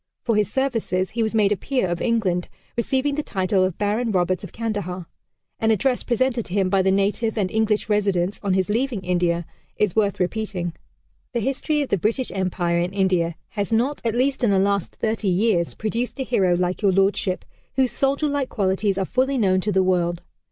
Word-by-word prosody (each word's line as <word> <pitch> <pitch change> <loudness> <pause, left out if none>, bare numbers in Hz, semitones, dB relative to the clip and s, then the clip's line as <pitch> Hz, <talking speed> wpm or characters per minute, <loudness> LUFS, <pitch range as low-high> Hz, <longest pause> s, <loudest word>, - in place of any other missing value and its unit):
For 230 - +1
his 210 0 +1
services, 225 -9 0
he 235 - -2
was 220 0 0
made 210 -2 +3
a - - +3
peer 255 0 -1
of 175 -1 -2
England, 200 -7 0 0.3
receiving 265 +4 0
the 300 - -1
title 190 -6 0
of 185 -2 -1
Baron 215 +4 0
Roberts 185 -1 +1
of 195 - -8
Kandahar. 205 -6 -3 0.5
An 225 - +2
address 245 +4 +2
presented 245 -1 0
to 175 - -8
him 195 -2 +2
by 195 -1 +4
the 190 - +2
native 205 +4 +1
and 195 -3 0
English 220 -1 +1
residents, 200 -3 +1
on 195 -2 +1
his 190 -1 +1
leaving 230 0 -1
India, 175 -2 0 0.3
is 210 -4 +1
worth 205 -3 +1
repeating. 180 -2 -2 0.6
"The 240 - 0
history 285 +5 0
of 275 - -7
the 200 - +1
British 230 +7 -1
Empire 180 -2 0
in 175 +2 -1
India 180 -4 +1
has 205 -1 -3
not, 245 +6 +1
at 230 -1 0
least 265 +1 +1
in 235 - +4
the 195 - +3
last 200 -1 +1
thirty 220 -1 -1
years, 180 -2 +1
produced 230 +5 -3
a - - 0
hero 190 -8 +2
like 180 +2 -1
Your 200 -2 +4
Lordship, 195 -1 +1 0.3
whose 260 -1 +2
soldier 280 +2 +1
like 285 -2 -1
qualities 195 0 0
are 195 - 0
fully 265 +6 +1
known 190 -5 +3
to 210 - -1
the 190 -1 +3
world. 175 -2 0
205 Hz, 200 wpm, -23 LUFS, 185-235 Hz, 0.6 s, by